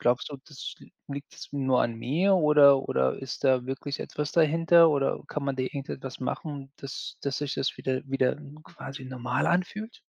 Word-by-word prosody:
glaubst 120 Hz, +3 st, +1 dB
du, 145 Hz, -, -6 dB
das 150 Hz, -3 st, -7 dB
l -, -, -15 dB, 0.2 s
liegt's 140 Hz, 0 st, -8 dB
nur 130 Hz, -3 st, +2 dB
an 115 Hz, -, -1 dB
mir 165 Hz, +12 st, +2 dB
oder 150 Hz, -4 st, +7 dB
oder 65 Hz, 0 st, +2 dB
ist 135 Hz, 0 st, -6 dB
da 130 Hz, -2 st, +3 dB
wirklich 135 Hz, +2 st, -4 dB
etwas 150 Hz, 0 st, -4 dB
dahinter 165 Hz, +1 st, +6 dB
oder 140 Hz, -2 st, +1 dB
kann 150 Hz, -, -3 dB
man 140 Hz, -1 st, 0 dB
da 130 Hz, -, 0 dB
irgendetwas 135 Hz, -1 st, -6 dB
machen, 140 Hz, +1 st, -4 dB
dass 140 Hz, -1 st, -7 dB
dass 140 Hz, -1 st, -1 dB
sich 145 Hz, -2 st, -2 dB
das 135 Hz, -, -1 dB
wieder 130 Hz, -1 st, -1 dB
wieder 135 Hz, -1 st, +1 dB, 0.3 s
quasi 135 Hz, -5 st, -9 dB
normal 125 Hz, 0 st, -2 dB
anfühlt? 200 Hz, +6 st, -1 dB
140 Hz, 180 wpm, -28 LUFS, 130-150 Hz, 0.3 s, oder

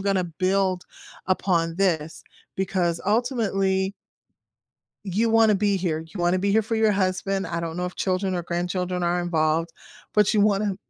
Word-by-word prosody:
gonna 195 Hz, -1 st, +1 dB
build 185 Hz, +2 st, 0 dB, 0.4 s
upon 175 Hz, -3 st, +1 dB
this." 165 Hz, -5 st, 0 dB, 0.3 s
Because 185 Hz, -3 st, 0 dB
ultimately 200 Hz, -5 st, +1 dB, 1.1 s
you 210 Hz, +4 st, 0 dB
wanna 225 Hz, -1 st, +5 dB
be 200 Hz, 0 st, +1 dB
here. 175 Hz, -4 st, -1 dB
You 165 Hz, +4 st, -11 dB
wanna 175 Hz, +1 st, +2 dB
be 200 Hz, +2 st, 0 dB
here 220 Hz, +2 st, +3 dB
for 220 Hz, +2 st, -3 dB
your 220 Hz, -1 st, +3 dB
husband, 195 Hz, 0 st, -1 dB
I 170 Hz, 0 st, -3 dB
don't 165 Hz, -1 st, -4 dB
know 180 Hz, -, -2 dB
if 180 Hz, -, -7 dB
children 185 Hz, 0 st, -1 dB
or 175 Hz, -, -2 dB
grandchildren 180 Hz, +1 st, -2 dB
are 175 Hz, +1 st, +1 dB
involved, 165 Hz, -1 st, 0 dB, 0.4 s
but 210 Hz, -1 st, +4 dB
you 215 Hz, -, +3 dB
wanna 205 Hz, -1 st, +2 dB
185 Hz, 160 wpm, -24 LUFS, 175-200 Hz, 1.1 s, wanna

